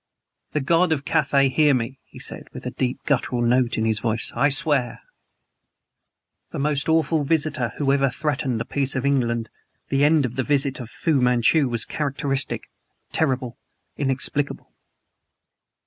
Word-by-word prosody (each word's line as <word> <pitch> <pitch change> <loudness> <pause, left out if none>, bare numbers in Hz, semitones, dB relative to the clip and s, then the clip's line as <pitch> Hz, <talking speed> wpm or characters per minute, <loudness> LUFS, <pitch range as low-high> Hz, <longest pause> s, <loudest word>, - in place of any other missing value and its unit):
"The 150 - 0
God 165 +5 +2
of 145 -3 -1
Cathay 140 -2 +2
hear 145 +1 +3
me," 125 +2 -3
he - - -16
said, - - -6
with - - -9
a - - -3
deep, 125 -1 -2
guttural 125 -3 0
note 120 0 +2
in 110 - 0
his 110 -1 +1
voice 115 0 0
"I 140 +5 +3
swear 140 -4 0 0.7
" - - -56
The - - -4
most 145 +1 -1
awful 160 -1 +2
visitor 145 -5 0
who 140 -2 +1
ever 135 -1 +2
threatened 140 -4 -2
the - - -3
peace 140 -2 0
of 130 +1 -1
England, 120 -5 0 0.4
the 140 +1 +2
end 150 -1 +4
of 125 +1 -5
the 130 - +1
visit 140 -1 0
of 120 -3 -7
Fu 150 +1 0
Manchu 125 +4 +3
was 115 -2 +2
characteristic 140 -2 -2 0.5
terrible 130 -5 -1 0.4
inexplicable. 140 +1 -2
135 Hz, 160 wpm, -23 LUFS, 125-145 Hz, 0.7 s, end